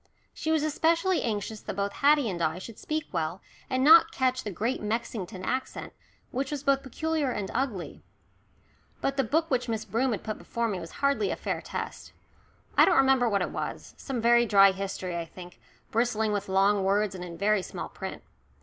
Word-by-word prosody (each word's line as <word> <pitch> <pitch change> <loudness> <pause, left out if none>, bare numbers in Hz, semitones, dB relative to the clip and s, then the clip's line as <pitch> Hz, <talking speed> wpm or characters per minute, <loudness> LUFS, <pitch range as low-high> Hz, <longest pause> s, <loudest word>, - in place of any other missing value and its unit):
She 315 - -4
was 315 -2 +2
especially 330 +4 +2
anxious 215 -1 -3
that - - -6
both 200 +1 -1
Haddie 290 -2 +4
and 180 -4 -3
I 160 +1 0
should 210 +4 -9
speak 310 0 -2
well, 165 +1 -2 0.3
and 260 0 +1
not 325 +3 +8
catch 255 -1 0
the 210 - -4
Great 225 +7 -2
Mexington 210 -3 -3
accent, 260 0 -3 0.4
which 270 +2 -2
was 290 -2 -4
both 275 -1 +3
peculiar 310 +2 -1
and 205 -5 -3
ugly. 235 -8 -3 1.0
But 275 - -1
the 270 - +2
book 320 +3 0
which 250 -2 0
Miss 220 -1 -2
Broom 235 +6 0
had 215 - -3
put 215 -1 -4
before 235 0 -2
me 200 -4 -2
was 165 -1 -8 0.2
hardly 280 +9 +2
a - - -1
fair - - -3
test. - - -6 0.6
I - - +7
don't 365 - +3
remember 265 -3 +4
what 200 -3 +1
it - - -4
was - - -5
some 265 -3 -4
very 235 +1 +4
dry 195 -2 +7
history, 190 -2 -4
I 170 -1 -3
think, 180 +1 -12 0.3
bristling 220 -2 +1
with 205 -1 -3
long 195 +1 +3
words, 200 +1 +1
and 180 -1 -7
in 170 -1 -8
very 205 +2 +2
small - - -6
print. - - -7
225 Hz, 195 wpm, -28 LUFS, 195-270 Hz, 1.0 s, not